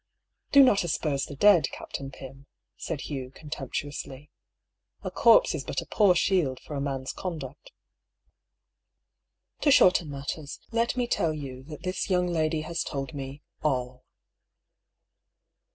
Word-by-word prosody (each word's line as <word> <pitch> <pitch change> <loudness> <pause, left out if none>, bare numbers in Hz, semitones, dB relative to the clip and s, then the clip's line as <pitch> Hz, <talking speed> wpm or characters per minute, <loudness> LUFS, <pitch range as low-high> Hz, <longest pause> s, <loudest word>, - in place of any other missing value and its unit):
" - - -51
Do 280 -1 +9
not 210 -8 +4
asperse 150 -4 -1
the 145 - -8
dead. 175 -3 +5
Captain 135 -1 -6
Pym,'* 135 +1 -12 0.3
said 150 - -5
Hugh, 135 -3 -5
contemptuously. 145 0 -6 0.3
" - - -41
A - - -4
corpse - - +5
is - - -3
but - - -3
a - - -6
poor 200 -4 +4
shield 165 -8 +1
for - - -10
a 140 - -2
man's 135 -2 -3
conduct. 150 -6 -7 1.9
To 300 - +2
shorten 180 - +5
matters, 140 +1 -6
let 235 +2 0
me 245 - +1
tell 165 -9 0
you 135 -4 -7
that 150 0 -10
this 185 +2 -2
young 180 -1 +2
lady 160 -2 0
has 170 +2 -3
told 140 +1 -4
me 140 0 -7
— - - -47
all." 125 -3 -1
150 Hz, 150 wpm, -27 LUFS, 135-180 Hz, 1.9 s, Do